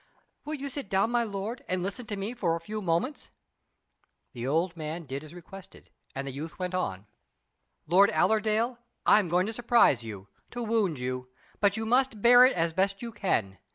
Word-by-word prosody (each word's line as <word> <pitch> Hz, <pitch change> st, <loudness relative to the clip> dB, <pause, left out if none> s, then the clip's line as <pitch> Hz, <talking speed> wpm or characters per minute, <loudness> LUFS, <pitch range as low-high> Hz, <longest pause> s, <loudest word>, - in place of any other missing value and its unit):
"Will 305 Hz, +1 st, -3 dB
you 280 Hz, -1 st, -5 dB
sit 275 Hz, -6 st, -5 dB
down, 195 Hz, +4 st, +2 dB
my 240 Hz, -1 st, +2 dB
lord, 210 Hz, +2 st, -5 dB
and 185 Hz, -1 st, -1 dB
listen 205 Hz, +5 st, -4 dB
to 205 Hz, -, -3 dB
me 200 Hz, +4 st, -4 dB
for 180 Hz, -9 st, 0 dB
a -, -, -4 dB
few 215 Hz, +4 st, -6 dB
moments?" 185 Hz, -, -1 dB, 1.0 s
The 120 Hz, -1 st, -5 dB
old 165 Hz, +5 st, 0 dB
man 160 Hz, +1 st, -5 dB
did 135 Hz, +2 st, -5 dB
as 155 Hz, -, -12 dB
requested, 185 Hz, +2 st, -13 dB, 0.2 s
and 135 Hz, +1 st, -4 dB
the 135 Hz, -, -4 dB
youth 150 Hz, +4 st, -7 dB
went 180 Hz, -1 st, -3 dB
on: 100 Hz, -, -2 dB, 0.8 s
"Lord 190 Hz, +5 st, +5 dB
Allerdale, 220 Hz, +3 st, +1 dB, 0.3 s
I -, -, +7 dB
am 200 Hz, -, -1 dB
going 180 Hz, +2 st, +2 dB
to 220 Hz, -, -4 dB
surprise 235 Hz, -, +3 dB
you 105 Hz, -3 st, -8 dB, 0.2 s
to 245 Hz, 0 st, -5 dB
wound 215 Hz, -8 st, +1 dB
you; 125 Hz, 0 st, -4 dB, 0.3 s
but 205 Hz, +1 st, +2 dB
you 220 Hz, -, -2 dB
must 250 Hz, 0 st, +2 dB
bear 245 Hz, +3 st, +8 dB
it 260 Hz, -, +3 dB
as 165 Hz, -1 st, 0 dB
best 195 Hz, +4 st, 0 dB
you 235 Hz, -, -5 dB
can. 110 Hz, -, -1 dB
195 Hz, 195 wpm, -28 LUFS, 160-225 Hz, 1.0 s, bear